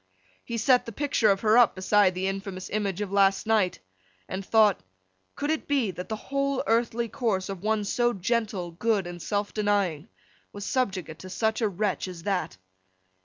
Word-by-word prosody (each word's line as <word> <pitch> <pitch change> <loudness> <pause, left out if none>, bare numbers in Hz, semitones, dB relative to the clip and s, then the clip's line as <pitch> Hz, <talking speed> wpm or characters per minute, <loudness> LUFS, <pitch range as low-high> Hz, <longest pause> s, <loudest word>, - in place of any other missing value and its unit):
He 235 - -4
set 250 +2 +3
the - - -4
picture 265 -3 +1
of 195 -1 +2
her 220 +2 +5
up, 240 - +5
beside 190 0 +3
the 185 +1 -2
infamous 195 -1 -5
image 205 -2 -1
of 205 -2 -3
last 195 -1 +3
night; 210 -5 +2 0.5
and 190 +1 -4
thought, 215 -1 +4 0.6
Could 290 +2 -1
it 315 - -2
be, 270 -8 +1
that 180 +3 -8
the 220 - -1
whole 275 +4 -1
earthly 235 +1 +1
course 220 -7 -1
of 195 -3 -5
one 215 0 0
so 240 +4 +1
gentle, 205 -3 -2
good, 200 +2 0
and 175 0 -7
self 205 +2 -2
denying, 200 -6 0 0.4
was 205 0 -7
subjugate 190 - -2
to 185 - -9
such 220 +4 -1
a 220 - +2
wretch 195 0 -1
as 175 -2 -8
that! 185 - -2
205 Hz, 180 wpm, -27 LUFS, 190-230 Hz, 0.6 s, her